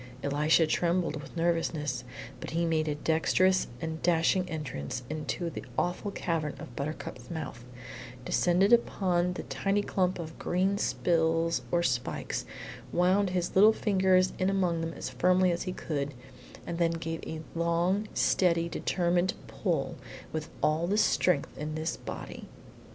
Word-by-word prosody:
Elisha 150 Hz, +3 st, +3 dB
trembled 170 Hz, -1 st, 0 dB
with 160 Hz, -, -11 dB
nervousness, 165 Hz, -6 st, 0 dB, 0.4 s
but -, -, -6 dB
he 170 Hz, +1 st, 0 dB
made 160 Hz, -1 st, +1 dB
a 150 Hz, -, 0 dB
dexterous 180 Hz, +5 st, +2 dB
and 160 Hz, +2 st, -4 dB
dashing 175 Hz, +2 st, +2 dB
entrance 125 Hz, -, -4 dB
into 155 Hz, +3 st, -3 dB
the -, -, -6 dB
awful 175 Hz, +3 st, -1 dB
cavern 165 Hz, -6 st, -2 dB
of 120 Hz, -, -10 dB
Buttercup's 150 Hz, +3 st, -5 dB
mouth; 155 Hz, -7 st, -5 dB, 0.6 s
descended 180 Hz, -, +3 dB
upon 180 Hz, -6 st, +2 dB
the -, -, -5 dB
tiny 205 Hz, +1 st, 0 dB
clump 185 Hz, -2 st, 0 dB
of 160 Hz, -2 st, -7 dB
green 190 Hz, +3 st, +1 dB
spills 165 Hz, -2 st, +1 dB
or 175 Hz, 0 st, +2 dB
spikes, 125 Hz, -5 st, -1 dB, 0.5 s
wound 185 Hz, +3 st, +3 dB
his 180 Hz, -1 st, -1 dB
little 210 Hz, +3 st, +7 dB
fingers 190 Hz, -3 st, +3 dB
in 185 Hz, 0 st, +2 dB
among 180 Hz, -4 st, +1 dB
them 165 Hz, 0 st, -3 dB
as -, -, -5 dB
firmly 180 Hz, +8 st, +3 dB
as 170 Hz, -, -2 dB
he 185 Hz, -, -3 dB
could, 145 Hz, -5 st, -3 dB, 0.5 s
and 170 Hz, -, -4 dB
then 165 Hz, -1 st, +3 dB
gave 165 Hz, 0 st, -4 dB
a 160 Hz, 0 st, -5 dB
long, 170 Hz, +5 st, +1 dB
steady, 170 Hz, -2 st, +3 dB
determined 175 Hz, +1 st, 0 dB
pull 165 Hz, -9 st, -2 dB, 0.4 s
with 155 Hz, 0 st, -3 dB
all 160 Hz, +3 st, +2 dB
the 205 Hz, +3 st, +1 dB
strength 180 Hz, -7 st, +2 dB
in 155 Hz, +1 st, -3 dB
this 155 Hz, +1 st, -2 dB
body. -, -, -8 dB
170 Hz, 145 wpm, -29 LUFS, 160-185 Hz, 0.6 s, little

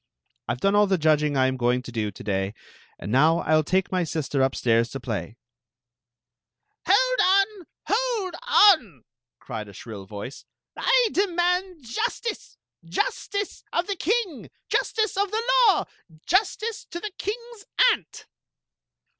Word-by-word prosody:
I 120 Hz, -, 0 dB
ve 125 Hz, -, -17 dB
done 195 Hz, -, +2 dB
all 205 Hz, 0 st, +4 dB
the 190 Hz, -1 st, +2 dB
judg 155 Hz, -2 st, +3 dB
ing 150 Hz, -2 st, 0 dB
I 130 Hz, -, +4 dB
am 130 Hz, 0 st, 0 dB
going 125 Hz, +1 st, +1 dB
to 125 Hz, -, -9 dB
do 110 Hz, -3 st, -2 dB
to 100 Hz, -, -11 dB
day, 95 Hz, 0 st, -2 dB, 0.4 s
and 100 Hz, -, -6 dB
now 155 Hz, +7 st, +4 dB
I -, -, -8 dB
11 155 Hz, -1 st, +4 dB
take 185 Hz, +3 st, 0 dB
my 185 Hz, -1 st, +1 dB
si^er 155 Hz, -4 st, -2 dB
up^s^ 120 Hz, -2 st, +1 dB
i& -, -, -3 dB
play." 115 Hz, -1 st, -5 dB, 0.6 s
" 120 Hz, 0 st, -34 dB
Ii@y -, -, +4 dB
on! 395 Hz, -1 st, +2 dB, 0.2 s
Hold 440 Hz, -5 st, 0 dB
cwi!" 340 Hz, -, +4 dB, 0.4 s
cried 110 Hz, -4 st, -7 dB
a -, -, -13 dB
^ritt 100 Hz, -1 st, -9 dB
vcw». 105 Hz, +7 st, -8 dB, 0.3 s
"I -, -, +3 dB
demand 360 Hz, -3 st, 0 dB
jostice! 445 Hz, -, -4 dB, 0.3 s
Justice 400 Hz, -, -3 dB
of 345 Hz, -, 0 dB
the 400 Hz, -, -2 dB
king! 370 Hz, -, -1 dB, 0.2 s
Ji^^e 435 Hz, -3 st, 0 dB
of 405 Hz, -, 0 dB
tht 440 Hz, +3 st, -1 dB, 0.3 s
law! 380 Hz, -, +2 dB, 0.4 s
Justice 430 Hz, +3 st, 0 dB
to 345 Hz, -, -7 dB
the 425 Hz, +3 st, -5 dB
king's 465 Hz, 0 st, -6 dB, 0.3 s
aunt." -, -, -6 dB
220 Hz, 155 wpm, -25 LUFS, -, 0.6 s, all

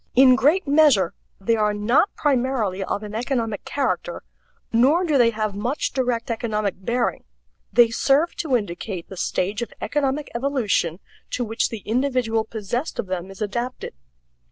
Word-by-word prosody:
In 255 Hz, 0 st, +7 dB
great 295 Hz, +8 st, +3 dB
measure 280 Hz, -, +4 dB, 0.3 s
they 230 Hz, +4 st, +1 dB
are 210 Hz, -1 st, +1 dB
not 235 Hz, -, +2 dB
primarily 250 Hz, -9 st, 0 dB
of 205 Hz, -, -3 dB
an 210 Hz, 0 st, -7 dB
economic 230 Hz, -2 st, -2 dB
character, 285 Hz, -, -2 dB, 0.5 s
nor 275 Hz, +10 st, +4 dB
do 310 Hz, -4 st, +1 dB
they 240 Hz, -3 st, +5 dB
have 215 Hz, -2 st, -2 dB
much 240 Hz, +8 st, -2 dB
direct 245 Hz, -3 st, -1 dB
economic 215 Hz, -4 st, -2 dB
bearing. 240 Hz, +4 st, -1 dB, 0.5 s
They 230 Hz, +2 st, +5 dB
serve 285 Hz, +8 st, +2 dB
to 280 Hz, -7 st, +2 dB
indicate 185 Hz, -3 st, -6 dB
the 190 Hz, -, -8 dB
stage 195 Hz, +4 st, -1 dB
of 235 Hz, -, -4 dB
economic 290 Hz, 0 st, -1 dB
evolution 235 Hz, -, 0 dB, 0.3 s
to 250 Hz, -, -2 dB
which 225 Hz, +1 st, 0 dB
the 225 Hz, -3 st, -7 dB
individual 245 Hz, -2 st, +1 dB
possessed 225 Hz, +6 st, -4 dB
of -, -, -2 dB
them 185 Hz, 0 st, -4 dB
is 195 Hz, +2 st, -5 dB
adapted. 240 Hz, -, -4 dB
235 Hz, 155 wpm, -23 LUFS, 210-265 Hz, 0.5 s, In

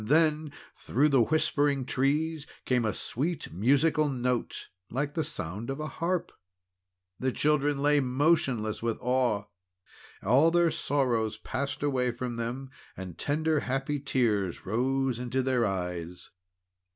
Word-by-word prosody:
Then 155 Hz, +4 st, +2 dB, 0.2 s
through 145 Hz, +5 st, +1 dB
the 135 Hz, -4 st, +4 dB
whispering 145 Hz, -1 st, +1 dB
trees 150 Hz, +4 st, 0 dB, 0.2 s
came 125 Hz, -3 st, +2 dB
a 110 Hz, -, +1 dB
sweet 150 Hz, -, -3 dB
musical 145 Hz, -, +3 dB
note, 125 Hz, -2 st, -2 dB, 0.2 s
like 145 Hz, +3 st, -2 dB
the 160 Hz, -, 0 dB
sound 100 Hz, -, -5 dB
of 135 Hz, +2 st, -3 dB
a 155 Hz, -, -3 dB
harp. 170 Hz, +4 st, -2 dB, 0.9 s
The 130 Hz, 0 st, 0 dB
children 145 Hz, 0 st, +1 dB
lay 145 Hz, 0 st, +4 dB
motionless 130 Hz, -5 st, +1 dB
with 115 Hz, -1 st, -1 dB
awe. 125 Hz, -5 st, +1 dB, 0.8 s
All 135 Hz, +10 st, +5 dB
their 170 Hz, -1 st, +3 dB
sorrow 125 Hz, -8 st, +1 dB
passed 140 Hz, +2 st, -3 dB
away 130 Hz, -3 st, +1 dB
from 120 Hz, 0 st, -4 dB
them, 125 Hz, +3 st, -4 dB, 0.3 s
and 90 Hz, -3 st, -7 dB
tender, 155 Hz, +1 st, 0 dB
happy 135 Hz, +3 st, -2 dB
tears 110 Hz, -, 0 dB
rose 130 Hz, +4 st, 0 dB
into 125 Hz, +1 st, -1 dB
their 125 Hz, -2 st, +2 dB
eyes. 90 Hz, -2 st, -4 dB
135 Hz, 130 wpm, -29 LUFS, 120-145 Hz, 0.9 s, All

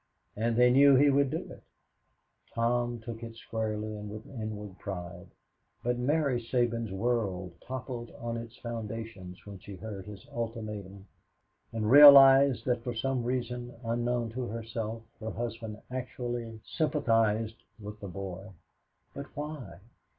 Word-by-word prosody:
And 115 Hz, +2 st, 0 dB
they 125 Hz, 0 st, +6 dB
knew 140 Hz, +2 st, +7 dB
he 140 Hz, +2 st, +6 dB
would 140 Hz, 0 st, +3 dB
do -, -, -3 dB
it. -, -, -11 dB, 0.9 s
Tom 120 Hz, +1 st, +1 dB
took 115 Hz, 0 st, -7 dB
it 115 Hz, -1 st, -7 dB
squarely 110 Hz, -1 st, -3 dB
and 105 Hz, 0 st, -7 dB
with 110 Hz, +1 st, -8 dB
inward 105 Hz, -6 st, -6 dB
pride, 90 Hz, -3 st, -6 dB, 0.6 s
but 120 Hz, 0 st, 0 dB
Mary 140 Hz, -1 st, +1 dB
Sabins' 115 Hz, -2 st, 0 dB
world 95 Hz, -4 st, -1 dB
toppled 125 Hz, -2 st, -6 dB
on 115 Hz, 0 st, -3 dB
its 115 Hz, +1 st, -7 dB
foundations 110 Hz, -5 st, -6 dB
when 100 Hz, -2 st, -9 dB
she 100 Hz, +1 st, -9 dB
heard 100 Hz, -1 st, -7 dB
his 100 Hz, -3 st, -10 dB
ultimatum 105 Hz, -4 st, -5 dB, 0.7 s
and 110 Hz, -1 st, -1 dB
realized 135 Hz, -3 st, +9 dB
that 120 Hz, -2 st, 0 dB
for 120 Hz, -1 st, -3 dB
some 130 Hz, +1 st, -1 dB
reason 125 Hz, 0 st, -3 dB
unknown 120 Hz, 0 st, -1 dB
to 125 Hz, +1 st, -3 dB
herself 115 Hz, 0 st, -4 dB, 0.2 s
her 110 Hz, -1 st, -4 dB
husband 115 Hz, -2 st, -5 dB
actually 120 Hz, -3 st, -4 dB
sympathized 115 Hz, -8 st, +1 dB, 0.2 s
with 105 Hz, 0 st, -8 dB
the 100 Hz, -, -7 dB
boy. 95 Hz, +2 st, -6 dB, 0.6 s
"But 140 Hz, 0 st, -7 dB
why? 145 Hz, -, -6 dB
115 Hz, 135 wpm, -30 LUFS, 105-125 Hz, 0.9 s, realized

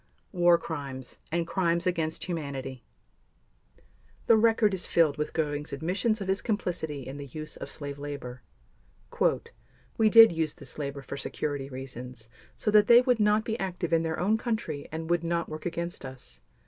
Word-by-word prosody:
War 175 Hz, -2 st, +5 dB
Crimes 140 Hz, -6 st, -6 dB
and 170 Hz, +1 st, 0 dB
Crimes 170 Hz, 0 st, 0 dB
against 165 Hz, -3 st, -1 dB
Humanity 140 Hz, -7 st, -5 dB, 1.4 s
The 230 Hz, -, +6 dB
record 220 Hz, -2 st, +4 dB
is 185 Hz, -, -3 dB
filled 160 Hz, -4 st, +3 dB
with 150 Hz, -, -1 dB
Göring's 150 Hz, -2 st, -2 dB
admissions 190 Hz, -, 0 dB
of 195 Hz, -, -4 dB
his 190 Hz, +1 st, +1 dB
complicity 165 Hz, -, -2 dB
in 135 Hz, +2 st, -7 dB
the 140 Hz, -1 st, -7 dB
use 155 Hz, +4 st, -7 dB
of -, -, -7 dB
slave 145 Hz, -1 st, -7 dB
labor. 135 Hz, -4 st, -6 dB, 1.6 s
"We 220 Hz, -1 st, +5 dB
did 225 Hz, -1 st, +9 dB
use 160 Hz, -2 st, -1 dB
this 140 Hz, -3 st, -11 dB
labor 140 Hz, -1 st, -4 dB
for 140 Hz, -, -6 dB
security 140 Hz, 0 st, -3 dB
reasons 125 Hz, -3 st, -8 dB, 0.3 s
so 210 Hz, -, 0 dB
that 210 Hz, 0 st, +6 dB
they 240 Hz, +1 st, +9 dB
would 250 Hz, -2 st, +2 dB
not 210 Hz, +1 st, +3 dB
be 225 Hz, 0 st, -2 dB
active 180 Hz, -3 st, -3 dB
in 165 Hz, -, +4 dB
their 160 Hz, -1 st, -2 dB
own 215 Hz, +5 st, +2 dB
country 220 Hz, -, -3 dB
and 160 Hz, +1 st, -4 dB
would 170 Hz, 0 st, +1 dB
not 170 Hz, 0 st, -1 dB
work 155 Hz, +2 st, -5 dB
against 170 Hz, +1 st, -4 dB
us. 130 Hz, -, -10 dB
160 Hz, 170 wpm, -28 LUFS, 140-190 Hz, 1.6 s, did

